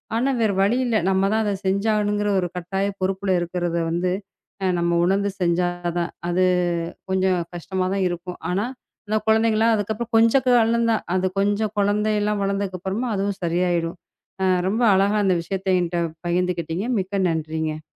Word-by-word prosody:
ஆனா 245 Hz, +4 st, +1 dB
வேற 220 Hz, -2 st, +3 dB
வழியில்ல. 235 Hz, +3 st, +1 dB
நம்ம 190 Hz, 0 st, +2 dB
தான் 220 Hz, 0 st, +2 dB
அதை 205 Hz, -, 0 dB
செஞ்சாகணுங்கிற 205 Hz, +1 st, +1 dB
ஒரு 180 Hz, -, -1 dB
கட்டாய 195 Hz, +3 st, -2 dB
பொறுப்புல 190 Hz, 0 st, 0 dB
இருக்கிறதை 175 Hz, -1 st, -1 dB
வந்து 180 Hz, +2 st, 0 dB, 0.5 s
அ, -, -, +1 dB
நம்ம 170 Hz, 0 st, +1 dB
உணர்ந்து 195 Hz, +3 st, +2 dB
செஞ்சாதான். 175 Hz, 0 st, 0 dB, 0.2 s
அது 180 Hz, +1 st, +2 dB, 0.7 s
கொஞ்சம் 190 Hz, -1 st, +2 dB, 0.2 s
கஷ்டமாதான் 190 Hz, +2 st, -1 dB
இருக்கும். 175 Hz, +1 st, -6 dB
ஆனா 195 Hz, +4 st, 0 dB, 0.4 s
அந்தக் 215 Hz, 0 st, -1 dB
குழந்தைகெல்லாம் 225 Hz, 0 st, +3 dB
அதுக்கப்புறம் 220 Hz, +3 st, -3 dB
கொஞ்சம் 230 Hz, +3 st, +4 dB
வளந்தா, 230 Hz, 0 st, +2 dB, 0.2 s
அது 185 Hz, 0 st, +1 dB
கொஞ்சம் 205 Hz, +1 st, 0 dB
குழந்தை 210 Hz, +2 st, +2 dB
எல்லாம் 210 Hz, 0 st, 0 dB
வளர்ந்ததுக்கு 195 Hz, -1 st, -2 dB
அப்புறமா 195 Hz, +7 st, -2 dB
அதுவும் 200 Hz, 0 st, -1 dB
சரியாயிடும். 170 Hz, 0 st, 0 dB, 0.5 s
அ, -, -, +3 dB, 0.2 s
ரொம்ப 220 Hz, +5 st, 0 dB
அழகா 200 Hz, +2 st, +2 dB
அந்த 185 Hz, -2 st, +3 dB
விஷயத்தை 190 Hz, +2 st, -2 dB
என்கிட்ட 175 Hz, 0 st, -1 dB, 0.3 s
பகிர்ந்துக்கிட்டீங்க. 175 Hz, +2 st, -1 dB
மிக்க 195 Hz, +1 st, -2 dB
நன்றிங்க. 155 Hz, -1 st, -3 dB
190 Hz, 145 wpm, -23 LUFS, 175-210 Hz, 0.7 s, கொஞ்சம்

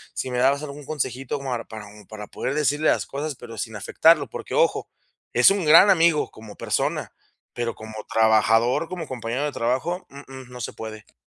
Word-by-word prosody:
si 130 Hz, -, -3 dB
me 125 Hz, -, -1 dB
dabas 140 Hz, +3 st, +2 dB
algún 145 Hz, 0 st, -8 dB
consejito 135 Hz, -2 st, -3 dB
como 135 Hz, -2 st, -5 dB, 0.2 s
para 110 Hz, -2 st, -9 dB
un 105 Hz, -1 st, -15 dB
para 105 Hz, -1 st, -8 dB
poder 135 Hz, -, -4 dB
decirle 150 Hz, +1 st, +1 dB
las -, -, +1 dB
cosas, 145 Hz, +1 st, -5 dB
pero 120 Hz, -2 st, -11 dB
sin 110 Hz, -2 st, -4 dB
afectarlo, 145 Hz, -, +3 dB
porque, -, -, -7 dB
ojo, -, -, +1 dB, 0.4 s
es 125 Hz, +10 st, +6 dB
un 195 Hz, -3 st, 0 dB
gran 165 Hz, +6 st, +8 dB
amigo 165 Hz, -4 st, +3 dB
como 110 Hz, -2 st, -12 dB
persona, -, -, -2 dB, 0.4 s
pero 120 Hz, -2 st, -3 dB
como 110 Hz, 0 st, -10 dB, 0.2 s
trabajador, 115 Hz, +6 st, +3 dB
como 175 Hz, -5 st, -6 dB
compañero 125 Hz, +2 st, -3 dB
de 145 Hz, -, -2 dB
trabajo, 130 Hz, +11 st, -2 dB
uh-uh, 135 Hz, -2 st, -11 dB
no 125 Hz, 0 st, -10 dB
se -, -, -5 dB
puede. 110 Hz, -1 st, -9 dB
130 Hz, 185 wpm, -23 LUFS, 115-150 Hz, 0.4 s, gran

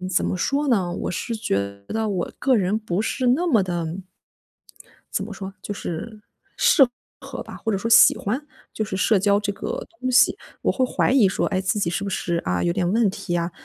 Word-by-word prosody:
嗯， 185 Hz, -, -4 dB
怎 185 Hz, -, +1 dB
么 -, -, -1 dB
说 280 Hz, +10 st, 0 dB
呢？ 185 Hz, -8 st, +1 dB
我 -, -, -3 dB
是 230 Hz, +6 st, -3 dB
觉 155 Hz, -, -1 dB, 0.3 s
得 220 Hz, -1 st, -1 dB
我 185 Hz, -4 st, -2 dB
个 265 Hz, -2 st, +2 dB
人 200 Hz, +2 st, +1 dB
不 210 Hz, -2 st, -2 dB
是 255 Hz, +3 st, -1 dB
那 320 Hz, +9 st, +2 dB
么 225 Hz, -9 st, +4 dB
地 175 Hz, 0 st, -3 dB, 1.1 s
怎 195 Hz, -, 0 dB
么 210 Hz, -, -8 dB
说， 195 Hz, 0 st, -7 dB
就 205 Hz, -, -4 dB
是 210 Hz, +5 st, -6 dB, 0.4 s
适 275 Hz, -6 st, +5 dB, 0.3 s
合 -, -, -7 dB
吧， -, -, -10 dB
或 225 Hz, -, -2 dB
者 195 Hz, -, 0 dB
说 230 Hz, -, -3 dB
喜 230 Hz, -, +8 dB
欢 230 Hz, +8 st, -2 dB, 0.3 s
就 215 Hz, -, -2 dB
是 190 Hz, -2 st, -4 dB
社 205 Hz, +2 st, +3 dB
交 200 Hz, +1 st, +3 dB
这 205 Hz, -1 st, -2 dB
个 -, -, -5 dB
东 255 Hz, -, -1 dB
西。 250 Hz, -, +5 dB, 0.3 s
我 -, -, +2 dB
会 260 Hz, -, +1 dB
怀 250 Hz, -, +1 dB
疑 245 Hz, -8 st, +5 dB
说， -, -, -1 dB
哎， 185 Hz, -2 st, 0 dB
自 190 Hz, +2 st, 0 dB
己 170 Hz, -4 st, 0 dB
是 195 Hz, +3 st, -2 dB
不 200 Hz, -, -3 dB
是， 175 Hz, -2 st, -1 dB
啊， 90 Hz, 0 st, 0 dB
有 85 Hz, -1 st, +1 dB
点 175 Hz, 0 st, 0 dB
问 225 Hz, -2 st, +3 dB
题 175 Hz, -3 st, -3 dB
啊， 170 Hz, +1 st, -1 dB
200 Hz, 240 characters per minute, -23 LUFS, 180-230 Hz, 1.1 s, 喜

